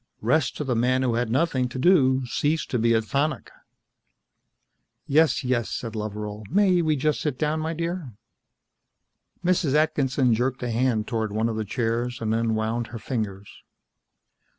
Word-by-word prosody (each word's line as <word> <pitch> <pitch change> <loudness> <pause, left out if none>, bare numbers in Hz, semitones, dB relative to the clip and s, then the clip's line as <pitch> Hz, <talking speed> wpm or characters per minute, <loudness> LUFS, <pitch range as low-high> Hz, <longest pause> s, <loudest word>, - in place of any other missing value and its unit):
Rest 130 +4 +1
to - - -2
the 130 -4 -1
man 130 +3 +2
who 125 -2 +1
had 120 0 0
nothing 130 -1 +1
to 120 - -7
do 130 -4 +4
ceased 150 +6 -1
to 125 - +1
be 115 +1 +3
a 110 - +3
tonic. 140 +5 -2 1.5
"Yes, 150 -1 +3
yes," 125 -3 0
said 115 -2 -5
Loveral. 105 0 -5
"May 185 -1 +3
we 155 -2 +1
just 150 +1 0
sit 145 -5 -2
down, 155 +2 0
my 160 +1 -2
dear?" 170 -4 -3 1.3
Mrs. 170 -6 +2
Atkinson 140 -5 +2
jerked 125 +3 -1
a 120 - -2
hand 115 -2 +1
toward 110 -2 -2
one 110 +2 0
of 115 - -3
the 110 0 -2
chairs 120 +2 -2
and 110 -1 -1
then 115 0 +1
wound 110 +2 -1
her 115 - -7
fingers. 105 -4 -5
125 Hz, 165 wpm, -25 LUFS, 115-150 Hz, 1.5 s, do